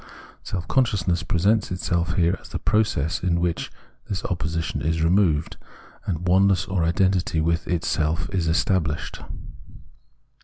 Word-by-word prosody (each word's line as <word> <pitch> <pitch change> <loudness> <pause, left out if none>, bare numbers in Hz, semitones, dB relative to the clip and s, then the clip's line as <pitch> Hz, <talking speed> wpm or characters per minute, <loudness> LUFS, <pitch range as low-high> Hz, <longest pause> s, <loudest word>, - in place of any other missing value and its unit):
Self 90 -2 -5
conscious 115 -9 +1
ness 85 -1 +2
presents 100 +5 +1
itself 85 -2 -1
here 85 -1 +2
as - - -13
the - - -3
process 105 -7 0
in 85 -2 +1
which 85 -1 -1 0.4
this 95 - -3
opposition 80 -2 -2
is 80 +3 0
removed, 85 -3 +2 0.5
and 90 -1 -2
oneness 95 +1 +4
or 95 -3 -1
identity 90 -1 +1
with 85 +2 0
itself 80 -2 0
estabhshed. 80 -3 0
85 Hz, 125 wpm, -24 LUFS, 80-95 Hz, 0.5 s, oneness